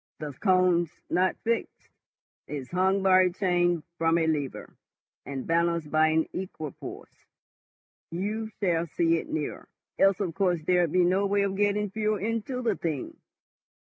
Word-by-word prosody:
"The 150 -2 -6
cone's 180 0 +3 0.2
not 185 +1 +2
fixed, 230 0 -2 0.6
it's 140 -4 -6
hung 190 +2 +2
by 185 -1 +6
a 185 - +3
chain 175 -3 +1 0.2
from 165 0 +3
a 165 - +2
lever, 150 -4 -3 0.5
and 135 -2 -5
balanced 170 -2 0
by 155 0 +4
an 160 0 +2
equipoise. 170 -5 -8 0.8
You 210 +6 -3
shall 170 -4 +1
see 165 +2 +2
it - - -9
nearer. 155 -2 -4 0.3
Else, 195 0 +4
of 185 -5 -2
course, 180 -3 0
there'd 175 -1 +2
be 180 +1 +4
no 190 +3 +2
way 200 0 +2
of 195 -1 -1
getting 205 0 +1
fuel 215 0 0
into 230 +5 -3
the 225 -4 +1
thing. 155 -7 -4
180 Hz, 150 wpm, -27 LUFS, 165-195 Hz, 0.8 s, by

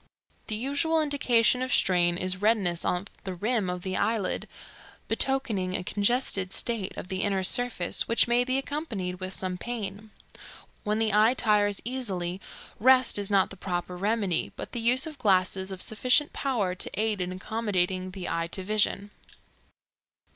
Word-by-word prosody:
The 215 - -1
usual 285 +7 0
indication 255 -5 +2
of 255 0 -2
strain 175 -4 +3
is 185 +1 -2
redness 205 -6 +1
of 180 +2 -1 0.2
the 190 -2 -5
rim 215 0 0
of 180 0 -4
the 185 -1 -2
eyelid, 220 -4 -1 0.6
betokening 215 -9 -1
a - - -2
congested 200 -2 +1
state 225 -6 -3
of 180 - -7
the 190 -1 -2
inner 195 -2 0
surface, 235 -3 +2
which 230 - +3
may 240 +1 +3
be 255 +1 0
accompanied 230 - -4
with 185 0 -5
some 185 -1 -4
pain. 215 -2 -5 0.7
When 210 +1 0
the 220 -2 0
eye 215 +4 +4
tires 205 -4 +1
easily 195 -8 -3 0.4
rest 255 -1 +5
is 200 0 0
not 195 -2 +2
the - - -8
proper 180 -1 -4
remedy, 200 -2 0
but - - -7
the 240 - -3
use 250 +5 +4
of 305 -3 -8
glasses 190 -1 +1
of 190 -1 -1
sufficient 255 +7 +2
power 225 -10 -1
to 185 - -3
aid 215 -3 0
in 180 0 -2
accommodating 185 -2 -2
the 185 -1 -6
eye 165 0 -1
to 190 - -3
vision. 205 0 0
205 Hz, 160 wpm, -27 LUFS, 185-240 Hz, 0.7 s, rest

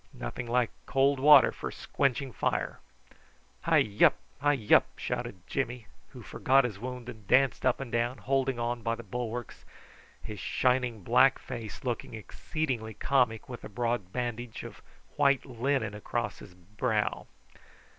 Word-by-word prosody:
Nothing 120 - -5
like 120 -1 +1 0.2
cold 135 0 +3
water 150 +3 +8
for - - -6
squenching 135 -2 -1
fire." - - -1 0.8
"Hi - - +4 0.2
wup! - - +7 0.2
hi 145 +1 +3
wup!" - - +7
shouted 90 -1 -4
Jimmy, 125 -4 -3 0.2
who - - -12
forgot 135 +1 +3
his 110 -5 -4
wound, 125 +1 -6
and 110 -5 -10
danced 130 +1 +3
up 125 - +2
and 135 -4 -6
down, 120 +2 0
holding 135 +2 0
on 120 0 -2
by 115 0 -1
the 115 - -9
bulwarks, 120 +2 -5 0.6
his 105 -2 -8
shining 125 +1 0
black 130 +6 +5
face 115 -5 -7
looking 120 -2 -3
exceedingly 110 0 -4
comic 120 -5 +1
with 125 -2 -8
a - - -7
broad 115 -4 -2
bandage 120 -1 -4
of - - -10 0.4
white 140 -2 +3
linen 125 -3 -1
across 105 - -3
his 90 - -13
brow. 105 +4 -2
120 Hz, 145 wpm, -29 LUFS, 110-130 Hz, 0.8 s, water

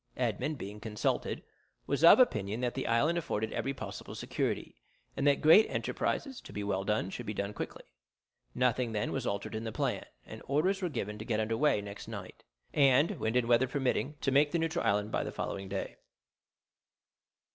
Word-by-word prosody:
Edmond, 125 +5 -1
being 105 0 -7
consulted, 105 -1 -2 0.4
was 140 +2 -1
of 170 - +9
opinion 110 - +2
that 125 -1 0
the - - -3
island 145 +9 +2
afforded 110 -8 -2
every 135 - -1
possible 135 - -7
security, - - -3 0.3
and 140 - +1
that 140 - +4
great 165 +8 +7
enterprises 270 -4 -2
to - - -12
be 105 - -4
well 95 -1 -1
done 100 -2 0
should 120 +1 -6
be 105 - -3
done 100 +1 -2
quickly. - - -6 0.7
Nothing 125 -2 +1
then 105 - -1
was - - -2
altered 100 +2 -3
in 110 +1 -3
the 110 - -3
plan, - - -1 0.2
and - - -9
orders 185 +8 +1
were 180 - 0
given 105 -7 -4
to 110 - -6
get 110 - 0
under 110 +1 0
weigh 140 -5 +2
next 100 0 -8
night, - - -8 0.3
and, 140 +1 +4
wind 110 +2 -1
and 125 -2 +2
weather 120 +2 +4
permitting, 135 +2 -1
to 135 - +1
make 145 +2 +4
the 170 - +1
neutral 165 +1 -1
island 105 +1 +1
by - - 0
the - - -4
following 95 -1 -4
day. 95 0 -4
120 Hz, 190 wpm, -31 LUFS, 105-145 Hz, 0.7 s, of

